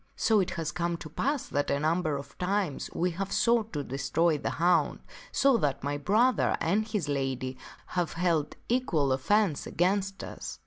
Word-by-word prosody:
So 220 -2 +3
it 185 - +1
has 160 -2 -2
come 170 -1 -1
to 155 -2 -9
pass 280 - -1
that 145 -1 0
a 140 - +1
number 155 -1 +1
of 140 - -10
times 185 -4 -1
we 180 +1 +1
have 195 +3 -4
sought 230 -2 +2
to 145 -2 -2
destroy 140 +5 +1
the - - -2
hound, 175 +2 +2 0.3
so 275 -3 +4
that 145 -8 -1
my 145 +1 -2
brother 220 - +3
and 205 +6 +1
his 210 -8 -2
lady 135 -2 -2 0.3
have 175 -2 -2
held 165 -4 0
equal 175 - +1
offence 180 +4 +1
against 195 +2 0
us. - - -7
170 Hz, 175 wpm, -29 LUFS, 145-205 Hz, 0.3 s, so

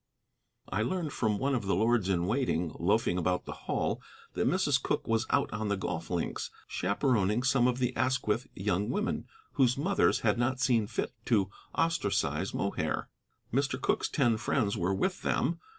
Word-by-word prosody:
I 100 - -1
learned 160 +5 -1
from 110 -3 +1
one 140 +5 0
of 115 -6 -1
the 100 - +2
lords 110 0 +2
in 90 -2 +1
waiting 100 - 0
loafing 90 0 +2
about 90 +1 0
the - - -6 0.2
hall - - 0 0.3
that - - 0
Mrs. - - +2
Cooke - - -1
was 115 +1 +1
out 140 -5 +1
on 105 0 -2
the 100 -1 0
golf 85 -3 -4
links, 85 -2 -2 0.2
chaperoning 105 +2 +1
some 130 -2 +3
of 125 -1 +1
the 125 -1 0
Asquith 130 -2 0
young 100 +2 0
women 210 - -1 0.2
whose 125 -1 +3
mothers 190 +7 +2
had 115 +1 +2
not 130 +2 +1
seen 115 -4 +2
fit 110 - -3
to 100 -6 +2 0.2
ostracize 165 - 0
Mohair. - - -2 0.4
Mr. 135 0 +1
Cooke's - - 0
ten 120 -6 +2
friends 110 -2 0
were 95 +3 0
with 185 - -1
them. - - 0
115 Hz, 170 wpm, -30 LUFS, 100-130 Hz, 0.4 s, some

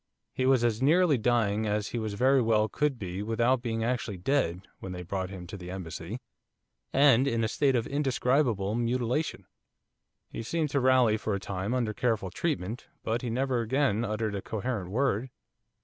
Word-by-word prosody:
He 130 - 0
was 130 -3 +4
as 115 -1 +1
nearly 155 0 +4
dying 110 -2 +1
as 105 0 -1
he 120 - -3
very 125 +5 +2
well 110 -2 +3
could 145 +2 0
be 95 -2 -5
without 115 +4 +1
being 115 -2 -2
actually 115 -4 -2
dead 95 -4 0
when 95 - -6
they 90 0 -6
brought 95 +1 -3
him 95 -2 -8
to 95 - -8
the 90 -1 -9
Embassy, 90 +3 -6 0.7
and 135 -2 +5
in 115 -3 +1
a - - +2
state 135 +4 +1
of 115 -2 +1
indescribable 130 -7 +1
mutilation. 120 +5 -1 0.8
He - - -6
seemed 150 +5 -1
to 140 - +2
rally 130 -4 +4
for 110 -2 -2
a - - -2
time 100 +4 -3
under 115 -4 0
careful 110 -6 -1
treatment, 120 - -3 0.2
but 115 +1 -1
he 125 - -3
never 125 +1 0
again 115 -2 +1
uttered 110 -1 -2
a 100 - -3
coherent 110 -3 -3
word. 125 +2 0
115 Hz, 180 wpm, -29 LUFS, 100-130 Hz, 0.8 s, and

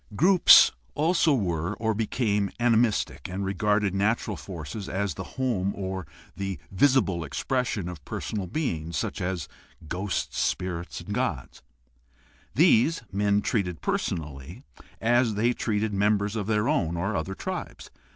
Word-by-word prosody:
Groups 180 - +7 0.2
also 160 -1 +3
were 90 -3 -1
or 110 0 0
became 105 -2 0
animistic 115 - +1
and 95 +2 -3
regarded 100 +1 +1
natural 105 +1 0
forces 90 +2 -7
as 95 -2 -1
the - - -6
home 110 -7 0
or 95 -3 -4 0.3
the 95 -1 -3
visible 95 - +3
expression 110 - -2
of 85 -5 -8
personal 100 +5 -4
beings, 85 - -2
such - - -3
as 90 -4 -2 0.4
ghosts, 95 +4 -2
spirits, 90 -2 -2
gods. 100 - -3 0.9
These, 135 +5 +4
men 100 +1 +1
treated 90 -7 -1
personally 75 - -3 0.2
— - - -27
as 120 -1 +2
they 115 +4 +2
treated 110 -2 -1
members 100 +1 +1
of 105 -3 -2
their 105 0 +1
own 85 -1 +1
or 100 +5 -1
other 90 +4 -3
tribes. - - -6
100 Hz, 130 wpm, -26 LUFS, 90-110 Hz, 0.9 s, Groups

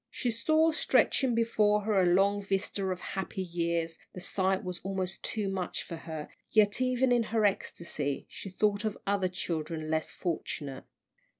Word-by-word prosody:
She 245 - -1
saw 315 +8 +3
stretching 265 -4 +3
before 215 -2 +3
her 205 -2 +2
a 180 - +4
long 195 +3 +4
vista 195 0 -1
of 185 -1 -2
happy 190 0 -3
years 170 -2 -1
the - - -7
sight 190 +1 0
was 180 -1 -4
almost 190 -1 -2
too 215 -3 -1
much 190 -2 -2
for 170 - -6
her, 160 -2 -6 0.2
yet 215 +2 +4
even 255 0 +2
in 240 -1 +5
her 220 -1 +2
ecstasy 160 -7 -1
she 195 - -8
thought 205 +2 +1
of 215 -1 -2
other 200 -2 +2
children 160 -3 -3
less 160 0 0
fortunate. 145 -5 -4
195 Hz, 165 wpm, -30 LUFS, 170-215 Hz, 0.2 s, in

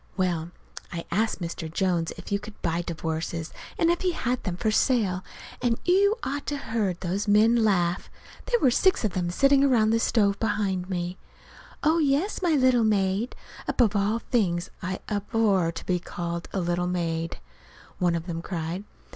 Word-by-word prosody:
Well, 175 -3 0 0.4
I 170 -1 -5
asked 215 +2 0
Mr. 165 -1 -5
Jones 175 -2 0
if - - -10
you 200 - +1
could 210 +1 -11
buy 170 0 0
divorces, 165 0 -4 0.2
and 335 0 +3
if 345 - -1
he 365 -1 +1
had 250 -4 -1
them 180 -3 -3
for 220 +2 0
sale; 210 -6 +2 0.4
and 235 -2 +1
you 400 +4 +4
ought 285 +2 -3
to 290 - -1
have 225 -5 -8
heard 195 -6 0
those 190 +4 -2
men 215 +3 +5
laugh. 180 -4 +1 0.4
There 480 -1 +2
were 260 - +4
six 370 -1 +3
of 210 - 0
them 175 -1 -1
sitting 275 +9 +4
around 230 -6 +4
the 230 - +3
stove 200 -3 +2
behind 195 -4 -1
me. 180 0 -3 0.6
"Oh, 320 +2 +4
yes, 300 +8 +1
my 340 -4 +3
little 255 -3 +4
maid" 205 +2 +1 0.3
(above 225 -4 +2
all 205 +3 +2
things 190 -8 0
I 185 +1 -4
abhor 205 -4 +1
to 165 - -8
be 180 -1 +1
called 170 0 -5
a 195 - -1
little 175 +1 0
maid!) 165 -2 -2 0.6
one 175 -2 +2
of 165 -1 -3
them 165 -2 -4
cried. 170 +2 -4
200 Hz, 180 wpm, -26 LUFS, 175-235 Hz, 0.6 s, men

